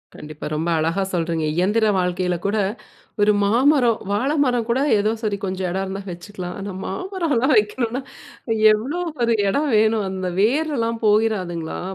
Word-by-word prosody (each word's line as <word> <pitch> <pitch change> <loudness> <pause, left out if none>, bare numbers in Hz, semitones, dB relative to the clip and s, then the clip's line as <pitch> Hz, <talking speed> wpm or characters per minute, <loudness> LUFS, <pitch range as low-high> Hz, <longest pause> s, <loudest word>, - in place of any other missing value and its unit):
கண்டிப்பா. 150 0 -9
ரொம்ப 160 +3 -1
அழகா 165 +5 0
சொல்றீங்க. 165 -2 -1
இயந்திர 210 +5 +2
வாழ்க்கையில 180 0 0
கூட, 205 +2 +1 0.6
ஒரு 210 +1 +5
மாமரம் 240 +2 +3
வாழை 265 +9 0
மரம் 245 -3 0
கூட 235 +3 +2 0.2
ஏதோ 215 +2 +1
சரி 205 -2 -1
கொஞ்சம் 185 -1 -2
இடம் 190 +2 -1
இருந்தா 195 +1 -5
வச்சுக்கலாம். 180 0 -7
ஆனா 195 -1 -5
மாமரம்லாம் 300 - 0
வைக்கணும்னா, 230 +4 0 0.7
எவ்வளோ 265 +11 -2 0.2
ஒரு 230 -1 +3
இடம் 285 +9 +1
வேணும்? 215 -1 +2
அந்த 185 -1 -3
வேரல்லாம் 235 -2 0
போயிறாதுங்களா? 200 -6 0
210 Hz, 140 wpm, -21 LUFS, 185-240 Hz, 0.7 s, ஒரு